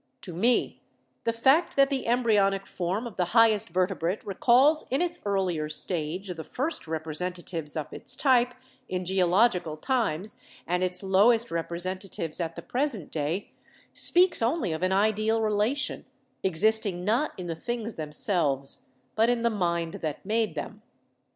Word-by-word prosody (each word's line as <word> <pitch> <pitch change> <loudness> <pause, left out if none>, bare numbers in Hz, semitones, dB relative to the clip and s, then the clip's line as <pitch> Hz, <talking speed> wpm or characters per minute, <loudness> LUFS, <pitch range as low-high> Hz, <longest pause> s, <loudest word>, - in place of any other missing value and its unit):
To 180 - -6
me 230 +9 +1 0.4
the 230 - +2
fact 265 +9 +3
that 275 0 +4
the 265 -4 -1
embryonic 210 -5 +2
form 190 +5 -3
of 235 - -8
the 180 - +2
highest 220 -3 +5
Vertebrate 185 +1 -1
recalls 255 - +3
in 265 - +1
its 350 0 0
earlier 185 -6 0
stage 170 +4 -3
the 165 -3 -5
first 270 - -3
rep 160 0 -3
resentatives 165 -1 -4
of 155 - -5
its - - 0
type 250 -3 +3 0.3
in 185 0 -3
geological 180 -2 +2
times 215 - -1 0.3
and 180 +1 0
its 180 +1 -1
lowest 220 +5 +3
representatives 170 0 -3
at 165 -1 -3
the - - -8
present 245 - -1
day, 160 +6 -2 0.4
speaks 355 -3 +3
only 230 - 0
of 160 - -4
an 185 0 +1
ideal 215 +3 +2
relation, 220 +7 0 0.4
existing 190 0 +1
not 240 +9 +1
in 180 - -6
the 170 - -3
things 230 +5 -4
themselves, 150 -3 -1 0.3
but 225 +2 +3
in 240 -1 +1
the 235 - +2
mind 170 -5 -1
that 155 +1 -4
made 220 +2 0
them. - - -6
195 Hz, 150 wpm, -27 LUFS, 170-235 Hz, 0.4 s, highest